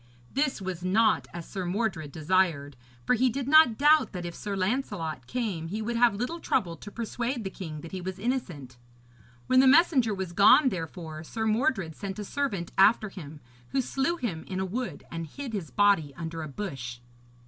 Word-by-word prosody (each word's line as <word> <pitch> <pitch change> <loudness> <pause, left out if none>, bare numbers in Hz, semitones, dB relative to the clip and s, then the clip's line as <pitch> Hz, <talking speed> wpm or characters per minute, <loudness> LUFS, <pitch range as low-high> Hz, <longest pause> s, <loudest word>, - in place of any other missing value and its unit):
This 275 -3 0
was 180 -2 -5
not 215 +4 +2
as 170 -1 -8
Sir 190 -2 -4
Mordred 180 -5 -2
desired; 155 -3 +1 0.3
for - - +3
he 250 +1 +3
did 265 +2 -3
not 300 -6 +6
doubt 300 -1 +4
that 180 -2 -5
if 170 - -5
Sir 200 +2 -5
Lancelot 185 - -2
came 200 - -3
he 205 +6 -4
would 230 +2 -2
have 235 -2 +4
little 250 +11 -3
trouble 180 - 0
to 205 - -10
persuade 235 +2 -3
the 190 - -4
king 155 -6 -7
that 165 - -10
he 185 - -5
was 185 +1 -5
innocent. 180 - -3 0.7
When 255 - +4
the 265 - +6
messenger 265 - +5
was 190 -3 -5
gone, 235 - +6
therefore, 165 -4 -6
Sir 220 +7 -4
Mordred 215 - 0
sent 195 +2 -6
a 210 - -4
servant 200 -8 -3
after 215 +2 +5
him, 155 -6 -10 0.3
who 270 - +2
slew 270 +7 -1
him 195 - -3
in 185 -1 -3
a 190 - 0
wood 240 +7 -4
and 165 -1 -5
hid 260 - -7
his 185 -8 -4
body 200 -9 +2
under 165 -1 -5
a 155 - -5
bush. 135 -8 -5
195 Hz, 190 wpm, -28 LUFS, 165-240 Hz, 0.7 s, not